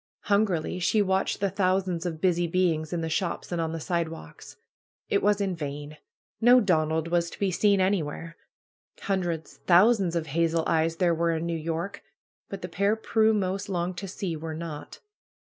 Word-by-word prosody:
Hungrily 200 -5 +1
she 205 +4 +2
watched 190 0 0
the 200 -2 +1
thousands 185 -2 0
of 160 -2 -5
busy 175 -1 +2
beings 165 -3 0
in 175 -2 -2
the 160 - -2
shops 170 +3 -2
and 175 -1 -1
on 160 -1 -2
the 165 - -4
sidewalks. 165 - -5 0.5
It 200 - +2
was 205 0 +2
in 195 -3 -1
vain. 145 -1 -6 0.4
No 245 +2 +7
Donald 160 -5 +1
was 170 0 +1
to - - -11
be 195 -2 0
seen 200 +2 +3
anywhere. 165 -3 -1 0.7
Hundreds, 175 -5 -2
thousands 190 0 +5
of 165 -2 -1
hazel 165 +2 +1
eyes 165 0 +1
there 175 0 +2
were 165 0 +1
in 160 +1 -3
New 170 - -2
York. 165 +4 -4 0.5
But 195 -2 -7
the - - -3
pair 200 +4 +1
Prue 220 0 +2
most 195 0 -2
longed 180 -1 -2
to 195 - -5
see 185 -2 -4
were 160 0 -5
not. 160 -2 -7
175 Hz, 175 wpm, -27 LUFS, 165-195 Hz, 0.7 s, No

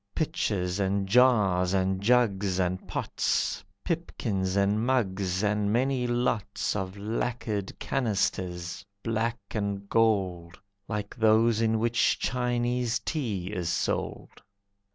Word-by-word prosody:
Pitchers, 100 - -1
and 100 0 0
jars, 100 -6 +4
and 95 0 +1
jugs, 100 -5 +2
and 90 0 -1
pots, - - -1 0.2
Pipkins, 105 - -2
and 100 +2 +2
mugs, 100 -7 0
and 105 0 +1
many 125 +1 +1
lots 120 -5 -1
Of 95 -1 -3
lacquered 105 -1 -3
canisters, 95 -6 -1 0.2
black 115 +1 0
and 100 -1 -3
gold, 95 -7 +1 0.3
Like 105 -2 -4
those 110 0 +4
in 110 0 +2
which 115 -3 +2
Chinese 125 0 0
tea 105 - -3
is 90 -4 -2
sold. - - -2
105 Hz, 110 wpm, -28 LUFS, 95-120 Hz, 0.3 s, jars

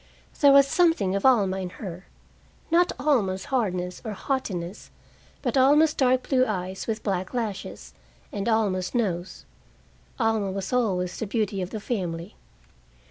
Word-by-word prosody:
There 285 -1 +7
was 275 0 +7
something 300 - +2
of 200 +6 +3
Alma 200 -7 +3
in 185 -1 -4
her, 185 -3 -8 0.6
not 350 +1 +4
Alma's 195 -11 +1
hardness 180 -7 -1
or 220 - -4
haughtiness, 195 -7 -4 0.5
but - - -1
Alma's 295 +4 +5
dark 255 -1 +2
blue 255 -2 +3
eyes 190 -5 -3
with 220 -1 -3
black 190 +2 -2
lashes, 215 -5 -4 0.4
and 200 +2 -2
Alma's 205 -3 0
nose. 185 -6 -2 0.7
Alma 225 -4 +1
was 195 +3 -4
always 185 -7 0
the 225 - -3
beauty 205 -2 -1
of 180 - -4
the 220 - -5
family. 185 -4 -4
210 Hz, 140 wpm, -25 LUFS, 185-255 Hz, 0.7 s, There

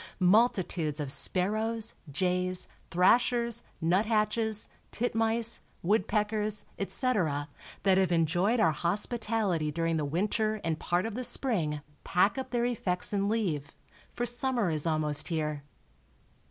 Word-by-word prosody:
Multitudes 180 -6 +2
of 145 -3 0
sparrows, 215 +8 +1 0.2
jays, 180 +4 -1 0.2
thrashers, 235 +5 +3 0.2
nuthatches, 215 +4 +1 0.2
titmice, 225 0 0 0.2
woodpeckers, 210 +2 0
etc., 190 - 0 0.4
that 190 -1 +4
have 185 -2 +2
enjoyed 175 +7 +2
our 165 -6 +4
hospitality 205 -1 0
during 165 +1 -1
the 155 - -1
winter 210 +8 0
and 165 -1 -1
part 175 +3 0
of 225 - -4
the 250 +4 -4
spring 195 - 0 0.2
pack 195 +7 +2
up 260 - -5
their 240 -1 0
effects 200 -6 -1
and 200 0 +1
leave, 175 -11 -2 0.4
for 240 - -2
summer 240 -5 +1
is 155 +1 0
almost 155 -2 +1
here. 150 -3 -2
195 Hz, 120 wpm, -29 LUFS, 165-225 Hz, 0.4 s, that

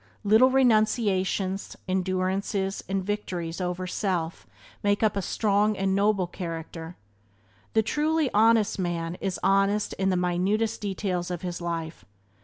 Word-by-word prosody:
Little 220 +5 +6
renunciations, 215 -6 +1
endurances 190 +1 -1
and 195 -1 -1
victories 185 -4 -3
over 180 0 -2
self 180 -3 -2 0.3
make 205 +1 +1
up 215 - +3
a 200 - 0
strong 210 +1 +1
and 195 0 +1
noble 200 -1 +2
character. 165 -1 -6 0.8
The 220 - +3
truly 300 +4 +1
honest 220 -1 +4
man 170 -2 -2
is 190 -2 -2
honest 195 +2 +2
in 190 0 +2
the 185 - +1
minutest 190 +6 0
details 190 -3 -2
of 175 -1 -4
his 175 -1 -4
life. 165 -1 -4
195 Hz, 130 wpm, -26 LUFS, 180-210 Hz, 0.8 s, Little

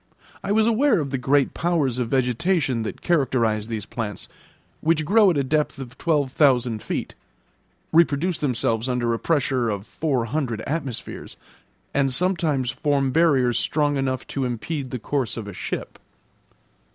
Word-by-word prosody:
I 195 - -2
was 215 +1 +4
aware 230 -1 +3
of 140 -3 -3
the 135 - -1
great 135 +1 +2
powers 150 -8 0
of 120 -2 -1
vegetation 130 +1 +1
that 110 - -6
characterise 120 -10 +1
these 110 -3 -4
plants, 110 -2 -5 0.5
which 160 -1 +1
grow 210 +3 +5
at 170 - +1
a 140 - +2
depth 150 +2 0
of 125 -2 -8
twelve 150 -5 0
thousand 125 -6 +2
feet, - - -4 0.8
reproduce 165 +1 +3
themselves 120 -3 0
under 120 -2 0
a 115 - -2
pressure 135 -6 +1
of 100 -1 -3
four 135 -6 -1
hundred 120 -4 -2
atmospheres, 140 -5 -4 0.6
and 135 -1 +2
sometimes 155 -5 0
form 135 0 0
barriers 135 -6 +3
strong 145 -1 +1
enough 130 -1 -1
to 135 - -2
impede 130 +3 -3
the 125 - -3
course 125 -1 -2
of 110 -3 -5
a 100 - -7
ship. 90 - -5
135 Hz, 155 wpm, -23 LUFS, 120-155 Hz, 0.8 s, grow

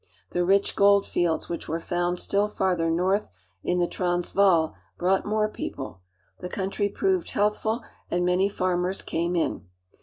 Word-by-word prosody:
The 175 - +1
rich 195 +2 +2
gold 200 0 +5
fields, 170 -2 0
which 170 - -5
were 165 +2 -2
found 175 +1 -1
still 200 +3 +1
farther 185 -5 0
I - - +1
north 185 +5 +1 0.3
in 180 - 0
the 175 - +3
Transvaal, 175 -1 +2 0.2
brought 190 +3 +1
more 215 0 +2
people. 135 - -6 0.4
The 180 - -6
country 195 +2 -1
I - - -18
proved 375 -3 +1
healthful, 210 +3 0 0.3
and 175 0 +1
many 180 +2 +3
farmers 185 -1 -1
came 170 +2 -1
in. 165 - -1
180 Hz, 160 wpm, -26 LUFS, 175-200 Hz, 0.4 s, gold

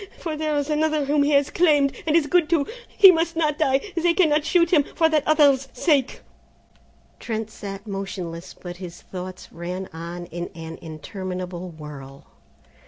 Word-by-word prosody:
For 320 -2 -4
there 305 -1 -1
is 285 -1 -1
another 305 -1 +1
whom 290 +1 +2
he 285 - +2
has 280 0 +3
claimed, 295 -5 +3
and 310 - +3
is 330 -3 +4
good 340 +1 +2
to. 320 -4 +2 0.2
He 390 -2 +8
must 330 0 0
not 305 -2 0
die, 275 +6 +1
they 340 0 +2
cannot 310 -5 +3
shoot 340 +1 +2
him, 305 -5 +5
for 325 - +4
that 310 -1 +3
other's 285 -3 +4
sake!" 280 -1 +1 1.0
Trent 220 -1 -4
sat 195 -1 -8
motionless, 190 -4 -6
but 175 -1 -9
his 175 -2 -9
thoughts 185 0 -8
ran 180 +3 -5
on 170 +2 -7
in 175 0 -6
an 165 0 -8
interminable 180 +2 -6
whirl. 145 -4 -11
270 Hz, 170 wpm, -23 LUFS, -, 1.0 s, He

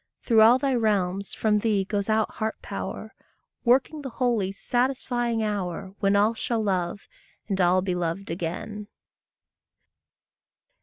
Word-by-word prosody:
Through 225 -3 +4
all 230 +3 +7
thy 270 0 0
realms 200 -4 0
from 210 -1 +2
thee 205 -3 +1
goes 200 +1 -2
out 220 0 +2
heart 220 0 -3
power, - - -6 0.5
Working 265 +5 +2
the 270 - -5
holy, 230 -6 0
satisfying 240 +1 -1
hour, 195 -2 -3
When 200 0 +2
all 210 +3 +4
shall 230 0 -2
love, 185 -1 -1 0.5
and 195 -3 0
all 180 +1 +3
be 185 -2 -1
loved 175 +2 -3
again. 185 +5 -5
210 Hz, 135 wpm, -26 LUFS, 190-230 Hz, 0.5 s, all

